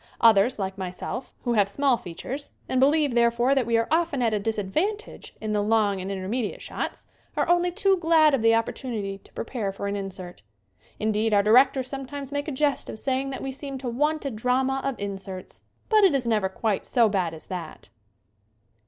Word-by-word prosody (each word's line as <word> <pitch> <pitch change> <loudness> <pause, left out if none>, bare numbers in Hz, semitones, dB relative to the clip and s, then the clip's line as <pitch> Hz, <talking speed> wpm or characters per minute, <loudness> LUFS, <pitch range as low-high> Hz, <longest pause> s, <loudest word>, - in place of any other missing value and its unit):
Others, 230 +2 +5
like 195 -1 -4
myself, 190 +7 -5
who 240 - 0
have 205 -3 +3
small 275 +4 +2
features, 245 - -7 0.2
and 260 0 +1
be 270 - +7
lieve, 295 -3 +2
therefore, 235 +2 +3
that 265 -4 +1
we 230 -1 +3
are 230 0 +1
often 320 -5 +1
at 225 -2 +2
a 210 - +1
disad 210 -1 -2
vantage 415 - -3
in 215 -1 -3
the 210 - +2
long 205 -2 +2
and 190 +2 -4
intermediate 200 +4 -3
shots, - - -5 0.3
are - - +1
only 350 0 +3
too 390 +1 +2
glad 320 -3 +4
of 270 - +2
the 225 0 +5
opportunity 225 -4 -3
to - - -22
prepare 230 -4 -3
for 195 +1 -6
an 200 0 -1
insert. 190 - -6 0.6
Indeed, 215 0 +1
our 200 - +4
directors 255 +4 +5
sometimes 275 +1 -6
make 285 +1 -2
a - - -2
jest 285 0 0
of - - -6
saying 265 +3 0
that 265 - -5
we 270 - -3
seem 275 0 -6
to 260 -1 -6
want 300 +5 0
a 275 - -1
drama 255 +4 0
of 275 -1 -1
inserts. 195 -2 -6 0.3
But 430 -2 +4
it 370 -7 +5
is 260 -3 0
never 215 -4 +1
quite 205 +1 -2
so 235 -3 +4
bad 185 -5 -1
as 155 - -12
that. 170 - -7
235 Hz, 205 wpm, -25 LUFS, 200-275 Hz, 0.6 s, be